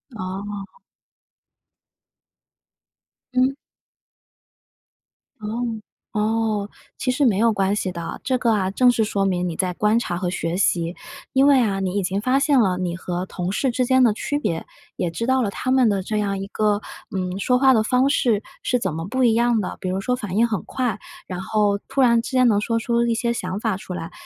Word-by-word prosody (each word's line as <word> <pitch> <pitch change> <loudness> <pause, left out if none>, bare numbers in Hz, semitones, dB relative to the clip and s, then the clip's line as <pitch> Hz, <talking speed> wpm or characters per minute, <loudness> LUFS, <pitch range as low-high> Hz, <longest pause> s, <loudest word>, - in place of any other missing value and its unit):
哦。 200 - -6 2.5
嗯。 255 +1 +3 1.9
哦， 225 +1 -3 0.3
哦， 215 -1 0 0.3
其 255 - 0
实 275 +3 +1
没 215 -6 +3
有 225 +1 +3
关 195 -1 +1
系 195 -3 -1
的， 170 -1 -6
这 260 -2 +1
个 240 -2 +1
啊， 195 -4 +1
正 250 +5 +4
是 225 -2 +1
说 200 -2 -1
明 180 -2 0
你 170 - -4
在 180 0 -1
观 210 +4 +2
察 180 -7 -1
和 180 0 -2
学 170 -1 -2
习。 175 -2 +1 0.4
因 270 +1 +4
为 280 -2 +6
啊， 200 -4 0
你 190 -1 -2
已 200 - 0
经 190 +2 -1
发 255 +5 +2
现 280 -1 +3
了 190 -6 +2
你 180 -2 -2
和 180 0 -3
同 180 -1 -4
事 265 +6 0
之 250 +1 0
间 260 +1 +4
的 235 - +5
区 290 +6 -2
别， 165 - -2 0.3
也 175 - -1
知 170 +8 -3
道 260 +1 +2
了 220 - 0
他 255 +5 -3
们 260 -2 +4
的 200 -3 +1
这 215 +3 -2
样 200 -2 -1
一 195 - -5
个， 210 0 0 0.3
嗯， 185 0 -2
说 250 +5 +2
话 265 0 +5
方 255 +4 +2
式 230 -7 +2 0.2
是 250 - +1
怎 190 -7 -2
么 165 +1 -4
不 260 +5 0
一 235 -2 +5
样 235 -1 +2
的， 185 - -5
比 185 - -5
如 190 +1 -1
说 250 - 0
反 210 -7 -5
应 225 +3 +4
很 215 -5 -2
快， 245 -5 -2 0.3
然 180 -1 -5
后 205 0 +1
突 275 - 0
然 235 -2 +5
之 230 - -7
间 255 -1 +4
能 205 -2 +3
说 230 +2 0
出 235 +1 +1
一 235 -1 +1
些 235 +1 0
想 185 -4 -3
法 220 -5 0
出 190 - -8
来。 165 -1 -6
210 Hz, 220 characters per minute, -22 LUFS, 190-245 Hz, 2.5 s, 为